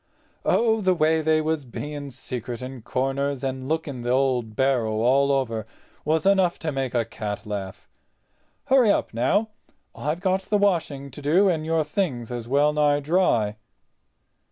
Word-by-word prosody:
"Oh, 225 -1 +3
the 185 -2 +2
way 160 -1 +2
they 155 0 +2
was 155 -1 -1
being 145 +3 -6
secret 125 -2 -5
in 130 -1 -7
corners, 135 +3 -2
and 130 0 -3
looking 155 -5 -2
the 120 - -3
old 125 -4 +1
barrow 130 -4 +1
all 135 +4 +3
over 115 -6 -1 0.4
was 160 +3 0
enough 190 -3 +3
to 155 - 0
make 135 -2 -3
a 115 -1 +2
cat 105 -1 -5
laugh. 100 -2 -6 0.8
Hurry 260 -4 +4
up, 200 - +1
now. 135 - +1 0.4
I've 150 +4 -3
got 190 0 +1
the 210 +2 0
washing 165 -9 0
up 140 - -11
to 140 - -9
do—and 160 +1 +2
your 165 -1 +2
things 150 - -2
is 120 -2 -5
well 145 +3 +3
nigh 145 -1 +3
dry." 140 - +1
140 Hz, 160 wpm, -24 LUFS, 125-160 Hz, 0.8 s, Hurry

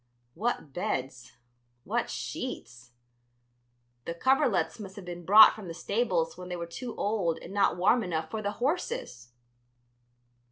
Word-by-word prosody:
What 210 - -2
beds! 125 -2 -4 0.5
what - - -1
sheets! 120 +1 -6 1.2
the 170 - -4
coverlets 225 -5 +2
must 195 -3 -8
have 200 - -9
been 175 -1 -7
brought 210 +5 +9
from 215 -4 -9
the 165 - -6
stables 180 -3 0
when 180 0 -8
they 180 - -3
were 170 -1 -4
too 230 +8 -7
old 200 -6 0
and 185 - -10
not 200 -3 +2
warm 210 +7 +4
enough 165 -4 -3
for 220 - -3
the 205 0 -2
horses! 265 - -3
185 Hz, 145 wpm, -29 LUFS, 165-220 Hz, 1.2 s, brought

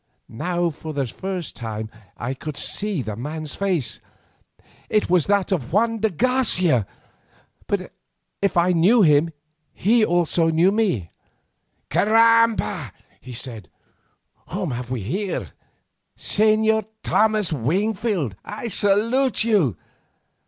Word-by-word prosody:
Now 175 +7 -1
for 155 0 -8
the 140 -2 0
first 185 +5 -5
time 110 -2 -6 0.3
I 125 +2 -3
could 145 +2 -7
see 205 -9 0
the 110 -2 -5
man's 150 +5 -5
face—it 185 -10 -2 1.1
was 180 -4 +3
that 200 -1 +1
of 150 -10 -1
Juan 225 +4 +1
de 220 +1 +1
Garcia! 180 - +3 0.8
But 185 -2 -3 0.5
if 200 -2 +1
I 175 +1 +4
knew 195 +7 +4
him 150 0 +4 0.4
he 225 +4 +3
also 170 -3 +2
knew 165 +4 +3
me. 190 - 0 0.8
"Caramba!" 225 - +3 0.3
he 130 - -10
said, 115 -6 -6 0.8
"whom 185 -4 -3
have 125 0 -5
we 125 -3 -3
here? 185 - -3 0.7
Señor 220 0 +2 0.2
Thomas 215 -5 +2
Wingfield 185 - -1
I 215 +3 -6
salute 220 +5 +2
you. 190 - +2
180 Hz, 115 wpm, -22 LUFS, 145-215 Hz, 1.1 s, I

